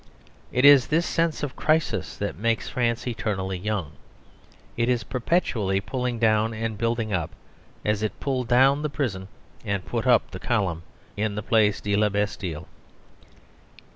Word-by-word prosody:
It 125 +3 +2
is 145 -3 +8
this 165 +3 +1
sense 165 -2 0
of 140 -2 -3
crisis 155 0 0
that - - -3
makes 115 +4 -1
France 120 -2 -1
eternally 95 -6 -2
young. 100 -6 -2 0.8
It 120 +1 0
is 125 -2 +1
perpetually 115 - 0
pulling 125 +4 -3
down 110 0 +2
and 110 0 -3
building 115 0 -1
up, 85 -3 -1 0.6
as 105 -1 +1
it 110 - -3
pulled 130 -4 -2
down 135 +4 +4
the 150 - -1
prison 120 -9 -3 0.4
and 100 -4 -2
put 120 +1 -2
up 120 -4 +4
the 95 - -7
column 95 -9 -1 0.3
in 105 0 -1
the 105 - -4
Place 105 -2 +2
de 100 0 0
La 105 0 +3
Bastille. 95 -6 -3
115 Hz, 155 wpm, -25 LUFS, 100-125 Hz, 0.8 s, is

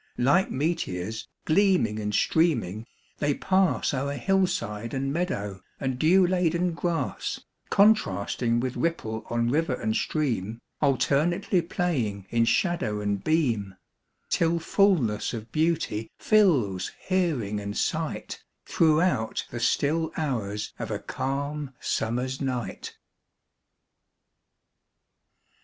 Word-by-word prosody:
Like 155 +10 +3
meteors, 110 - -2 0.2
gleaming 170 - +3
and 105 -1 -2
streaming, 115 - +1 0.3
they 145 -1 +1
pass 190 -4 +1
O'er 140 +1 -1
hillside 140 - 0
and 135 +1 -1
meadow, 105 - -2 0.2
and 130 -2 -2
dew 180 +5 +5
laden 180 -1 +1
grass, 165 -5 -2 0.3
Contrasting 120 - +3
with 125 +1 -2
ripple 110 -10 -2
on 120 0 0
river 150 -2 +1
and 110 -2 -2
stream, 115 -8 -1 0.2
Alternately 150 - +2
playing 145 - -2
in 115 -1 +3
shadow 140 - +1
and 100 -1 -2
beam, 120 - +1 0.6
Till 165 0 +2
fullness 165 - +2
of 110 0 -8
beauty 155 -9 0
fills 145 - +3 0.2
hearing 150 - 0
and 100 0 -5
sight - - -2 0.2
Throughout 160 -7 +2
the 120 - -4
still 160 +7 +1
hours 110 -9 -2
of - - -4
a - - -1
calm 140 0 -4
summer's 125 +4 -2
night. 125 -3 -4
135 Hz, 105 wpm, -26 LUFS, 110-170 Hz, 0.6 s, dew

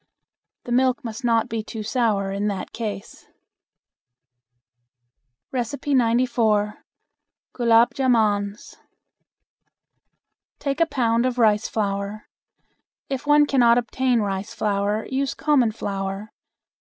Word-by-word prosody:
The 245 - -8
milk 255 0 +2
must 230 +3 -6
not 230 -2 +2
be 225 0 -3
too 215 0 -7
sour 210 -4 0
in 200 +1 -2
that 200 -2 -4
case. 210 -4 -6 2.3
94. 235 -4 +1 0.7
Gulab 235 -1 +4
Jamans. 215 -5 0 1.8
Take 280 +3 -2
a 335 - +4
pound 235 -3 +1
of 250 -1 -3
rice 215 -3 +3
flour. 200 0 -3 0.8
If 270 +1 -4
one 295 0 +6
cannot 240 -4 +4
obtain 245 0 +1
rice 200 +2 -3
flour 210 0 -1
use 270 +1 -2
common 280 -7 +2
flour. 195 0 -5
230 Hz, 100 wpm, -23 LUFS, 210-250 Hz, 2.3 s, one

